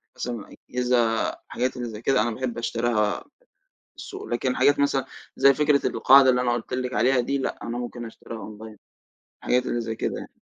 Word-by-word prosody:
مثلًا 125 - -3 0.4
الأجهزة 125 0 +1 0.5
حاجات 125 +1 -2
اللي 120 -1 -4
زي 105 -1 -8
كده 135 -1 +2
أنا 120 +2 0
باحب 125 +1 -4
أشتريها 115 -3 0 0.2
من - - -29 0.5
السوق، - - -8
لكن 125 +2 -1
حاجات 145 0 +4
مثلًا 140 -2 +2 0.3
زي 140 0 +6
فكرة 150 0 +2
القاعدة 135 0 +6
اللي 125 0 +2
أنا 120 -1 +1
قُلت 120 +1 -3
لِك 125 0 -2
عليها 125 +2 +3
دي، 140 +3 -1
لا 135 - -3
أنا 120 +1 -4
ممكن 120 -1 -5
أشتريها 115 0 -9
أونلاين 110 0 -10 0.6
الحاجات 125 0 +1
اللي 120 - -1
زي 115 -1 -4
كده - - -2
يعني. - - -11
125 Hz, 190 wpm, -25 LUFS, 115-130 Hz, 0.6 s, زي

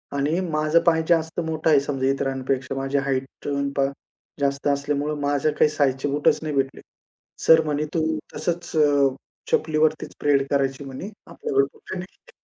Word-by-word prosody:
आणि 145 +5 +1
माझं 155 +1 +3
पाय 160 -1 +4
जास्त 165 -1 +2
मोठं 160 0 0
आहे 150 -3 +6
समजा 135 -1 -2
इतरांपेक्षा 135 -1 -1
माझी 135 +1 -1
हाईट 135 -1 0 0.2
पण 140 -1 -1
पहा. 135 0 +2 0.5
जास्त 140 0 0
असल्यामुळं 145 +1 0
माझ्या 145 +1 +1
काही 150 - +3
साइजचे 140 -2 0
बूटच 145 +1 +2
नाही 155 -2 -3
भेटले. 135 -1 -1 0.6
सर 160 0 +7
म्हणे, 150 0 -1
"तू 165 - +2 0.3
तसंच 170 +3 -3
अ, 145 -2 +4 0.4
चपलीवरतीचं 155 0 +1
परेड 140 -2 +3
करायची 135 0 0
म्हणे 135 +8 -7 0.2
आपल्याकडे 135 0 +1
बुटं 190 - -8
नाहीत." 180 +1 -11
145 Hz, 155 wpm, -23 LUFS, 135-155 Hz, 0.6 s, सर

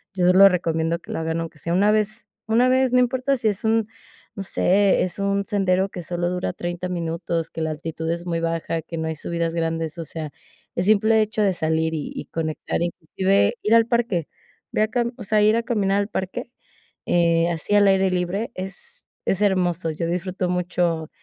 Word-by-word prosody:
yo 180 -1 +4
lo 195 +1 +9
recomiendo 165 -2 0
que - - -11
lo - - -3
hagan, 160 0 -2
aunque 165 -1 -7
sea 170 - -2
una 200 +4 +4
vez 215 +1 -1 0.2
una 235 +3 +4
vez, 260 0 +3
no 250 - +5
importa 255 +2 +1
sí 230 - -1
es 205 -2 -1
un, 220 -1 +2 0.5
no 195 - -4
sé, 195 +1 +3
es 180 - -4
un 200 0 0
sendero 190 -2 +1
que 180 -3 -7
sólo 175 +1 -2
dura 180 0 -2
30 175 +1 -4
minutos, 165 -1 -2
que 165 - -6
la 160 0 -1
altitud 160 +1 -5
es 170 +1 -4
muy 165 -1 -2
baja, 165 0 -2
que 165 +1 -7
no 160 0 -2
hay 160 - -2
subidas 170 +2 -2
grandes. 165 -1 -2
O 165 - -4
sea, 155 -1 -6 0.5
el 175 - 0
simple 215 +2 +4
hecho 215 0 -1
de 195 -2 +3
salir 160 -1 0
y 150 - -4
y - - -6
conectar, 160 0 -3
inclusive 190 +6 +1
ir 215 - +2
al 230 0 +5
parque, 235 - 0 0.4
ve - - 0
a 215 - +2
cam 235 +1 -1
o - - -7
sea, 210 +1 +2
ir 215 +1 +5
a 235 - 0
caminar 205 -4 +1
al 205 - -3
parque, 210 +5 -4 0.5
eh, 170 -1 +3
así 170 +5 -3
al 205 -1 +6
aire 190 -1 +3
libre 185 +7 -1
es 195 - -7 0.2
es 195 +2 0
hermoso. 180 -4 +1
Yo 165 +2 -3
disfruto 180 +2 -2
mucho, 175 -3 -1
180 Hz, 205 wpm, -23 LUFS, 165-210 Hz, 0.5 s, lo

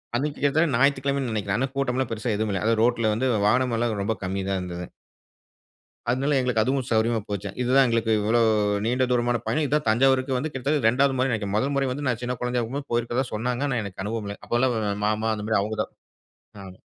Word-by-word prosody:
அன்னைக்கு 145 +4 -1
கிட்டத்தட்ட 145 +2 +2
ஞாயித்துக்கிழமைனு 140 -1 +1
நினைக்கிறேன், 100 -2 -1
அதனா 135 - 0
கூட்டம் 135 -2 0
எல்லாம் 130 -2 -1
பெரிசா 115 +1 -2
எதுவும் 110 -1 -1
இல்ல. 95 - -2
அதாவது 115 -1 +2
ரோட்ல 115 -2 +2
வந்து 130 +4 0 0.2
வாகனம் 125 +2 +2
எல்லாம் 115 -3 -1
ரொம்ப 110 +2 -1
கம்மி 95 +1 -2
தான் 95 -1 0
இருந்துது. 90 -1 -6 1.2
அதனால 135 +4 +1
எங்களுக்கு 125 -4 +1
அதுவும் 130 0 0
சௌரியமா 115 +1 +2
போச்சு, 100 0 -3
இது 125 - -1
தான் 135 - +7
எங்களுக்கு 115 -1 +1
இவ்வளோ 110 +3 +2 0.4
நீண்ட 125 +3 +1
தூரமான 120 0 +1
பயணம். 155 - +1
இது 140 - -8
தான் 150 - -2
தஞ்சாவூருக்கு 130 +2 +3
வந்து 150 +4 -3
கிட்டத்தட்ட 135 -1 0
2வது 135 +4 +3
முறைன்னு 130 0 +1
நெனைக்கிறேன். 105 -2 -2
மொதல் 135 +5 0
முறை 135 -1 +1
வந்து 145 +2 -4
நான் 120 -2 -1
சின்ன 125 +1 -2
குழந்தையாருக்கும் 125 +3 -2
போயிருக்கிறதா 120 +2 0
சொன்னாங்க, 120 +4 -1
ஆனா 125 -3 0
எனக்கு 95 -1 -6
அனுபவம் 110 0 -3
இல்ல. 100 - -5
அப்போல்லாம் 120 +1 +1
ஒ 110 - -1 0.2
மாமா 110 +1 0
அந்த 105 - -6
மாரி 110 - +3
அவுங்க 110 +1 -4
தான் - - -10 0.7
ஆமா. 95 0 -11
120 Hz, 210 wpm, -25 LUFS, 110-130 Hz, 1.2 s, தான்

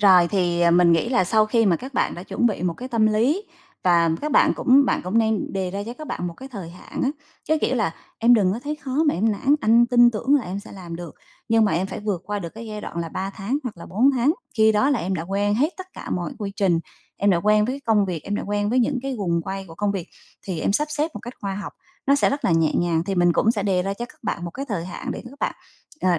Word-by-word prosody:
Rồi 185 -4 +6
thì, 175 -3 0
à, 170 0 +5
mình 175 0 +5
nghĩ 165 +8 +2
là 215 -8 +2
sau 215 +3 +3
khi 225 0 +2
mà 175 -4 +3
các 260 - -9
bạn - - +1
đã 175 - -7
chuẩn 240 +5 0
bị 205 -5 -1
một 175 -2 0
cái 255 - -7
tâm 225 -3 +2
lý 250 - +1 0.4
và 170 -2 +4
các 300 0 -3
bạn - - +5
cũng 270 +2 +5
bạn - - +1
cũng 190 +6 +1
nên 220 -3 0
đề 190 -2 -2
ra 200 +1 -4
cho 240 - -6
các 310 +2 -9
bạn 175 - -3
một 170 - -5
cái 265 +1 -10
thời 195 -9 -7
hạn 180 - -8
á, 265 - +2 0.3
chớ 315 0 +2
kiểu 260 - +1
là 200 -8 0 0.2
"Em 240 +2 +6
đừng 190 -4 +3
có 230 - -4
thấy 300 +1 -3
khó 275 0 -1
mà - - +2
em 215 +3 +1
nản, 270 +8 +2
anh 230 +2 +5
tin 240 -1 +6
tưởng 245 +6 +1
là 275 - +3
em 185 +3 -4
sẽ - - -13
làm 175 -4 -8
được, 170 -3 -8 0.3
nhưng 225 -1 +4
mà 210 - +1
em 180 +4 0
phải - - -6
vượt 205 -4 -2
qua 205 +1 -2
được 170 -4 -5
cái 225 +1 -8
giai 210 -1 -6
đoạn 170 - -8
là 165 -1 -3
3 190 +4 -4
tháng 220 +8 -2
hoặc 245 -7 -5
là 170 - -10
4 240 +9 +3
tháng. 265 +3 +2 0.2
Khi 220 0 +5
đó 260 +7 +3
là 270 - +2
em 185 +3 -2
đã 165 - -3
quen 200 +3 0
hết 295 - +1
tất 375 0 -8
cả - - -9
mọi 175 -1 -2
quy 200 -3 -4
trình, 185 -4 +2 0.4
em 200 0 +2
đã 175 - +4
quen 210 +4 +3
với 250 - -1
cái 280 - -6
công 220 -5 +2
việc, 170 -4 -3
em 205 - -3
đã - - -2
quen 205 +1 0
với 255 - +2
những 250 +2 +1
cái 270 -1 -3
guồng 170 -4 0
quay 195 +2 -5
của 165 - -10
công 205 +3 0
việc 185 -4 -5 0.3
thì 180 -5 -4
em - - +1
sắp 300 +7 +1
xếp 300 +2 -1
một - - -6
cách 240 +2 -8
khoa 195 -1 -3
học, 200 0 -6 0.3
nó 280 - +5
sẽ 285 - +3
rất 280 +1 -3
là - - +3
nhẹ 165 -1 +3
nhàng", 170 -2 +1
thì 195 +1 -2
mình 175 -1 +4
cũng 220 - +3
sẽ 210 -4 -1
đề 185 -3 +1
ra 195 +1 -2
cho 240 - -5
các - - -19
bạn 175 -5 -3
một 170 - -4
cái 275 +9 -6
thời 175 -6 -2
hạn 180 - -6
để - - -7
các 280 - -15
bạn, - - -1 0.5
ờ, 180 -3 +2
205 Hz, 305 wpm, -23 LUFS, 180-240 Hz, 0.5 s, Rồi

